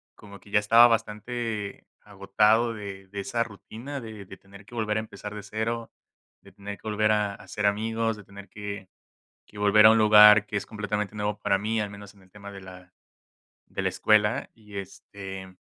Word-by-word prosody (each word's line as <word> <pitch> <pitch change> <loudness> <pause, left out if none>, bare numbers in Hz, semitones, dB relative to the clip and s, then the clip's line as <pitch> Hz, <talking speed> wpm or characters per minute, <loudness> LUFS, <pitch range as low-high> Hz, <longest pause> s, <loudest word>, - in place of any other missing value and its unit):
como 100 -2 -13
que 100 - -19
ya 105 - +3
estaba 115 +3 +7
bastante 115 -1 -3 0.2
agotado 105 +3 +2
de 100 -3 -8
de 100 0 -6
esa 115 +4 -1
rutina 120 +6 -9
de 110 -4 -9
de 95 - -12
tener 100 +1 -16
que 120 - -13
volver 110 -2 -1
a - - 0
empezar 105 -1 -9
de 105 - -7
0, 110 +3 -3 0.5
de - - -18
tener 100 0 -8
que 110 - -12
volver 105 0 +1
a 105 -2 0
hacer 95 +2 -5
amigos, 110 +2 0
de 105 - -12
tener 100 +1 -13
que 100 -2 -7 0.6
que 105 - -14
volver 105 +1 +5
a - - +9
un 115 - +4
lugar 105 -1 +8
que 105 - -5
es 100 - -2
completamente 105 -1 -3
nuevo 105 0 -2
para 100 -1 +1
mí, 110 +2 -1
al 105 - -5
menos 100 0 -12
en 100 - -21
el 95 - -23
tema 100 0 -11
de 100 -1 -10
la 90 -1 -13 0.7
de - - -5
la - - +1
escuela, 110 +4 +2
y 105 -3 -12
este 95 -1 -9
105 Hz, 200 wpm, -26 LUFS, 100-110 Hz, 0.7 s, a